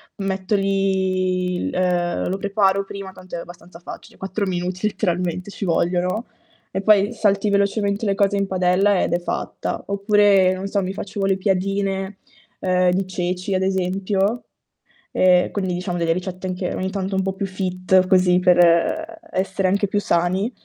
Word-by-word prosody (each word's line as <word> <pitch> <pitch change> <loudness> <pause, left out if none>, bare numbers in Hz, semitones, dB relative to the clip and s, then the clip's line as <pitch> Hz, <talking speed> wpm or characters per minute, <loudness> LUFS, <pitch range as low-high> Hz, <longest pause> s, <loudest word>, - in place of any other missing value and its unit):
metto 195 0 -2
lì, 190 -2 0
ehm, 175 -1 0
lo 190 - -1
preparo 195 -1 +1
prima, 195 -1 -8
tanto 185 -1 -10
è - - -3
abbastanza 175 0 -11
facile. 175 - -11
4 195 +1 -3
minuti 180 +2 -2
letteralmente 180 -1 -2
ci - - -7
vogliono, 180 +5 0 0.5
e 190 - -2
poi 205 +2 +4
salti 205 -2 +1
velocemente 200 +1 +1
le 195 - +1
cose 200 0 +2
in 200 -1 0
padella 185 +2 +2
ed - - -1
è 175 - +2
fatta. 175 - -4
Oppure, 200 -2 +3
non 190 +1 -5
so, 200 0 0
mi 185 - -3
facevo 195 0 -3
le 195 -1 +2
piadine, 195 0 -1 0.4
ehm, 185 -1 +2
di 190 +1 0
ceci, 185 +1 -3
ad 185 - +1
esempio, 190 +3 0 0.7
e 180 -1 +4
quindi 190 -3 -2
diciamo 180 0 -3
delle 170 -1 +1
ricette 185 +1 -5
anche 180 0 -3
ogni 190 0 -3
tanto 195 -1 -3
un 190 - +1
po' 190 0 -2
più 195 +1 -3
fit, 185 0 +1
così, 180 -1 +4
per 180 - +3 0.2
essere 190 0 -1
anche 200 +2 +1
più 205 - 0
sani, 185 +4 0
190 Hz, 165 wpm, -21 LUFS, 180-200 Hz, 0.7 s, poi